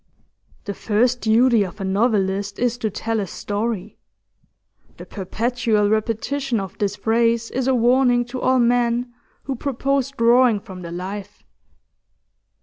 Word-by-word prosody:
'The 200 - -4
first 240 +5 +1
duty 230 +1 +4
of 185 -3 -8
a - - -4
novelist 200 -1 0
is 245 -1 0
to 230 -3 -2
tell 225 +2 -2
a 200 - -2
story:' 205 +2 -4 1.0
the - - -9
perpetual 220 +1 -1
repetition 230 +4 -1
of 195 +1 -6
this 205 -1 0
phrase 230 +1 +1
is 260 0 -1
a 265 - +3
warning 245 0 +3
to 250 +1 -6
all 260 0 +3
men 240 0 +1 0.3
who 270 - -3
propose 275 +1 -1
drawing 240 -3 +4
from 190 -3 -10
the 170 -1 -7
life. 195 +3 -7
230 Hz, 140 wpm, -21 LUFS, 205-245 Hz, 1.0 s, duty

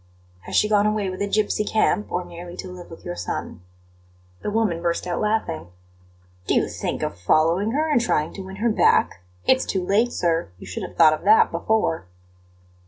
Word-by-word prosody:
"Has - - -4
she 210 - +4
gone 210 -1 +3
away 210 -3 0
with 185 - -7
a 200 - 0
gipsy 210 +1 +1
camp, 215 -1 +1
or 180 0 -2
merely 175 +1 -9
to 185 - -7
live 180 -1 -10
with 165 - -12
your 90 - -4
son?" 90 0 -5 0.8
The - - -2
woman 205 -6 0
burst 170 0 -1
out 175 -1 -2
laughing. 210 - -1 0.8
"Do - - +2
you - - +2
think - - -4
of 85 - -4
following 165 - +2
her 310 +3 +1
and 295 -6 +3
trying 155 -10 0
to 195 - -7
win 190 0 -8
her 225 +3 +1
back? 90 - +3 0.3
It's 260 0 +4
too 185 -2 -2
late, 220 +6 +2
sir; 170 -4 0
you - - -11
should 90 - -6
have - - -7
thought 155 -2 +7
of 155 - -5
that 215 +2 +6
before!" 215 - 0
190 Hz, 200 wpm, -23 LUFS, 165-215 Hz, 0.8 s, thought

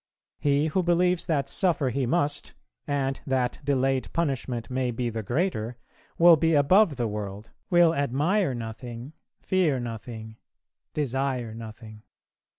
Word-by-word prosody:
He 145 +1 +2
who 160 +4 +1
believes 180 0 +2
that 140 -4 0
suffer 160 -7 +1
he 130 +1 -1
must, 145 0 0 0.3
and 135 -1 -1
that 130 -2 0
delayed 135 -1 0
punishment 130 -7 -1
may 130 -1 0
be 120 0 -2
the 110 0 -3
greater, 120 - -1 0.4
will 170 0 +8
be 165 0 +2
above 165 +4 +5
the 120 -2 -1
world, 105 0 -6 0.2
will 175 -2 +5
admire 145 - +1
nothing, 120 +3 -7 0.3
fear 170 -8 +2
nothing, 110 -1 -7 0.6
desire 135 -4 -1
nothing. 110 -1 -10
135 Hz, 130 wpm, -26 LUFS, 115-160 Hz, 0.6 s, will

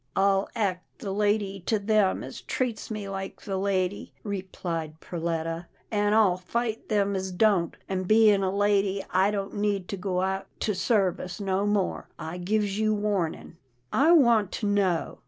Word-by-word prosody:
" - - -40
I'll 195 0 +2
act 190 -5 -2
the 200 -5 -3
lady 205 -1 0
to 220 - +3
them 205 -1 +2
as - - -8
treats 245 -4 -2
me 210 -2 -4
like 195 0 -6
the 195 - -4
lady," 190 0 -1
replied 175 -6 -4
Perletta, 165 0 -3
" - - -33
an' 205 0 +2
I'll 200 -5 +4
fight 225 +4 -3
them 200 -2 +1
as 190 0 -2
don't, 180 -3 +2
and, 185 -1 -2
bein' 215 -2 +5
a 190 - +1
lady, 200 0 +1
I 190 +2 +3
don't 200 -1 -3
need 205 -3 0
to 200 - -3
go 185 -1 -1
out 190 +1 -1
to 210 - +1
service 185 -2 0
no 195 0 0
more. 205 -2 0
I 160 +2 -6
gives 205 +2 0
you 215 0 +2
warnin'." 200 -5 -2 0.2
" 125 0 -21
I - - +7
want 235 - +5
to 215 - -3
know 195 -5 +1
195 Hz, 175 wpm, -27 LUFS, 185-210 Hz, 0.2 s, I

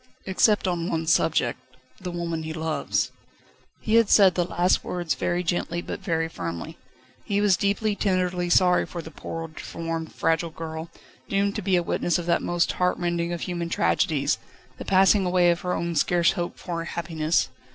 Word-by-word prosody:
"Except 195 +1 +3
on 175 -1 -1
one 160 0 -1
subject 160 -6 +2 0.4
the 180 - -5
woman 170 -2 -3
he 160 0 -5
loves." 160 -1 -1 0.7
He 220 +1 +3
had 230 -3 +4
said 195 -3 +6
the 175 - +1
last 180 +1 +1
words 175 -3 -2
very 175 +1 -1
gently 170 0 -1
but - - -5
very 165 -1 -1
firmly. 85 - -6 0.4
He 200 0 0
was 205 -2 +4
deeply, 200 +3 0
tenderly 180 -3 0
sorry 180 0 +4
for 170 -2 -6
the 160 - -10
poor, 165 0 -6
deformed, 165 +1 -5
fragile 165 +1 0
girl, 160 0 -7 0.4
doomed 200 0 +1
to - - -2
be 190 -1 +1
a 175 - +2
witness 175 +1 0
of 175 - -4
that 170 0 +2
most 175 -1 +1
heartrending 175 -1 0
of 170 -2 -4
human 170 -2 -3
tragedies, 150 -4 +1 0.4
the - - -6
passing 195 +1 +4
away 180 -1 +3
of 170 - -2
her 180 0 -1
own 170 0 -2
scarce 170 +2 +3
hoped 175 0 -4
for 170 -2 -4
happiness. 165 -1 -1
175 Hz, 175 wpm, -25 LUFS, 165-180 Hz, 0.7 s, said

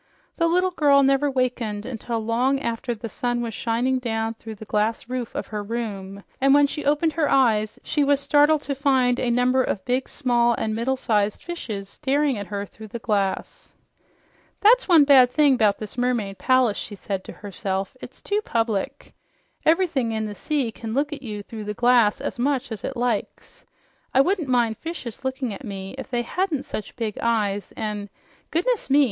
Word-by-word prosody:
The 335 - +3
little 365 +2 +2
girl 285 -5 +4
never 275 +1 +3
wakened 240 -5 -1
until 235 -1 -4
long 250 +4 +1
after 235 0 -3
the 230 +1 -6
sun 240 +3 -2
was 230 -1 -4
shining 240 +4 0
down 225 -2 -2
through 225 -1 -9
the 220 - -10
glass 215 +2 -1
roof 250 -2 -4
of - - -3
her 210 - -2
room, 200 -3 -5 0.2
and 275 +1 +5
when 290 0 +6
she 295 +1 -4
opened 300 +2 +2
her 315 -3 +1
eyes 220 -5 +2
she 295 - +1
was 280 0 +3
startled 295 +1 +3
to 285 - -2
find 260 -3 +2
a 245 - 0
number 250 +2 +3
of 195 -6 -2
big, 255 +1 0
small 240 -3 +2
and 220 -1 -2
middle 245 +4 0
sized 210 -4 0
fishes 220 - -5
staring 285 +3 0
at 205 -2 -5
her 200 -1 -4
through 220 +2 -12
the 225 - -6
glass. 200 -4 -2 0.9
"That's 475 +4 +5
one 335 -5 +7
bad 270 -3 +7
thing 285 0 +4
'bout 210 -4 +3
this 215 +3 -7
mermaid 235 -6 -1
palace," 255 -5 +3
she 205 - -6
said 195 -1 -4
to - - -8
herself. 195 -1 -4
"It's - - -11
too 410 +1 0
public. 225 - -2 0.5
Ever'thing 315 -9 +2
in 220 0 -1
the 210 - -5
sea 275 0 -1
can 225 0 -6
look 290 +2 0
at 290 - -7
you 210 -5 -6
through 215 0 -8
the 210 0 -4
glass 240 -3 +4
as - - -5
much 265 -1 0
as 220 - -6
it 265 - -4
likes. 240 -3 -3 0.5
I 265 - +7
wouldn't 350 -1 0
mind 235 -3 +2
fishes 320 -9 -7
looking 260 -3 -2
at 270 - -9
me 195 -4 -6
if 265 - -7
they 240 -2 -1
hadn't 325 0 -1
such 210 - -6
big 220 -4 -3
eyes, 210 -4 0
an' 210 -1 -4 0.4
goodness 420 +6 0
me! 280 +2 +5
245 Hz, 190 wpm, -24 LUFS, 215-275 Hz, 0.9 s, one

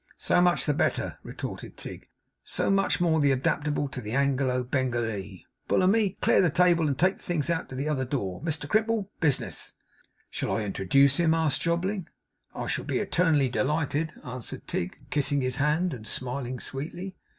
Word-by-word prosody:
'So - - +3
much 175 -1 +3
the 150 - +2
better,' 150 - -1
retorted - - -7
Tigg. - - -8 0.4
'So - - 0
much 195 0 +3
the - - 0
more 160 -3 +3
adaptable 145 +2 +1
to 130 - -6
the 105 0 -5
Anglo 135 -2 +1
Bengalee. 120 -7 -2 0.2
Bullamy, 200 +1 +3
clear - - +5
the 180 - +4
table 170 0 +4
and 140 -3 -1
take 185 +4 +3
the - - -16
things 170 -2 -1
out 165 - -2
by 130 - -7
the 140 +3 -2
other 145 -4 0
door. 110 -9 -3
Mr 155 -2 -2
Crimple, 215 +1 +1
business.' 150 -5 0 0.6
'Shall - - -1
I - - -1
introduce 130 +8 +3
him?' 165 -2 +3
asked 160 -3 +1
Jobling. 175 +2 -1 0.5
'I - - -3
shall - - -2
be - - -1
eternally 160 -6 +2
delighted,' 150 +4 0
answered 125 -1 -7
Tigg, 85 - -3
kissing 145 -1 +2
his 130 -1 0
hand 155 +5 +1
and 110 -4 -8
smiling 125 0 -2
sweetly. 175 +7 -6
145 Hz, 175 wpm, -27 LUFS, 130-170 Hz, 0.6 s, clear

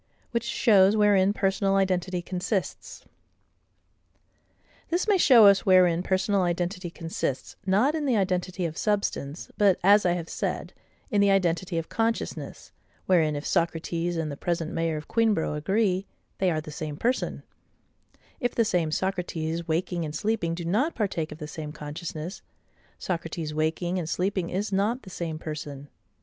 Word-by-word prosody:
Which 235 -1 -1
shows 205 -4 +4
wherein 200 -2 +4
Personal 195 -1 +1
identity 185 -2 0
consists. 185 +2 -3 1.8
This 350 +5 0
may 405 -3 +4
show 245 -9 +7
us 200 -1 +6
wherein 180 -3 +5
personal 190 +2 +1
identity 175 +1 -1
consists: 165 -6 -4
not 210 +10 +3
in 310 -2 -2
the 245 -4 +3
identity 185 -1 -1
of 160 -1 -4
substance, 200 -8 -2
but, 200 -3 +4
as 205 +2 +6
I 175 - +2
have 170 -2 -4
said, - - -3 0.4
in 205 - +3
the 200 - +4
identity 180 -2 +1
of 165 - -2
consciousness, 225 0 -3 0.3
wherein 160 -5 +3
if 145 - -5
Socrates 170 0 -1
and 160 -2 -2
the - - -5
present 165 +1 -2
mayor 165 -1 -1
of 150 - -8
Queenborough 220 -9 +1
agree, 190 +5 0 0.3
they 190 - +3
are 155 -2 0
the 155 - -9
same 150 -1 -5
person: 250 +7 -1 1.0
if 245 - -1
the 230 - +3
same 175 -6 +1
Socrates 170 -2 -2
waking 170 +1 -1
and 150 -1 -5
sleeping 205 -3 -1
do 170 0 -6
not 230 - +1
partake 175 -8 -2
of 150 - -8
the 150 -2 -7
same 150 -1 -6
consciousness, 155 +3 -6 0.6
Socrates 165 -3 -4
waking 160 +4 -1
and 165 -2 -4
sleeping 185 -1 -1
is 200 +3 -2
not 210 +6 0
the 190 - -11
same 165 -3 -4
person. 145 -3 -7
180 Hz, 155 wpm, -26 LUFS, 165-200 Hz, 1.8 s, show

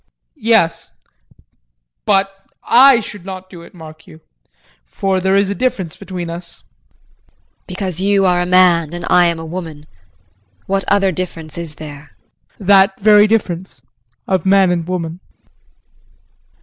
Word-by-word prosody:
JEAN. - - -26
Yes. 165 -8 +2 1.2
But 195 -1 +2 0.3
I 255 0 +6
should 205 -3 -9
not 185 0 -9
do 175 -3 -11
it, 170 - -16
mark 155 -2 -13
you, 80 - -15 0.6
for 190 - -2
there 190 +1 +1
is 200 0 +2
a - - 0
difference 200 -8 -2
between 185 -3 -7
us. 170 0 -8
JULIE. - - -40 0.3
Because 185 -2 -5
you 200 0 +2
are 180 -1 +2
a 180 - -2
man 175 -3 +3
and 175 - -6
I 180 0 +5
am 170 -1 0
a 165 - -7
woman? 160 -3 -7 0.8
What 195 0 -1
other 195 -1 +2
difference 165 -3 -6
is 165 -3 -7
there? 145 -1 -11 0.4
JEAN. 200 - -11
That 195 -1 +4
very 210 0 +5
difference 180 - -2 0.4
of 190 -3 0
man 190 -1 +3
and 170 -2 -2
woman. 175 -2 -4
180 Hz, 150 wpm, -16 LUFS, 165-195 Hz, 1.2 s, I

